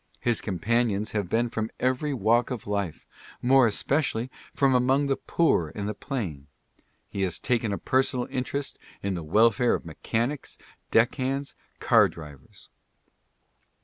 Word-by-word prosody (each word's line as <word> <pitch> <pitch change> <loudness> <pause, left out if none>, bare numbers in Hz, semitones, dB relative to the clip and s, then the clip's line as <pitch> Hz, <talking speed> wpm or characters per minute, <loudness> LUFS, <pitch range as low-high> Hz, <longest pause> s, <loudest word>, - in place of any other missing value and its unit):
His 120 -2 0
companions 110 +1 0
have 100 -5 -2
been 115 +4 +2
from 110 -1 -2
every 130 +4 0
walk 120 -1 +2
of 125 -4 -5
life 100 -5 -3 0.2
— - - -20
more 130 0 +6
especially 125 +1 0 0.2
from 135 -2 +2
among 130 +3 +3
the 140 -1 +1
poor 90 - +1
and 100 -1 -3
the 105 - -2
plain. 95 - -5 0.6
He 100 - -5
has 90 -3 -1
taken 115 -4 0
a 100 - -1
personal 130 +4 +1
interest 135 +2 -3 0.2
in 100 -1 -1
the 85 - -4
welfare 110 +8 +3
of - - -6
mechanics, 115 - -3 0.3
deck 115 +1 +4
hands, 135 +1 -2 0.3
car - - +5
drivers. 75 -5 -12
115 Hz, 150 wpm, -26 LUFS, 100-130 Hz, 0.6 s, more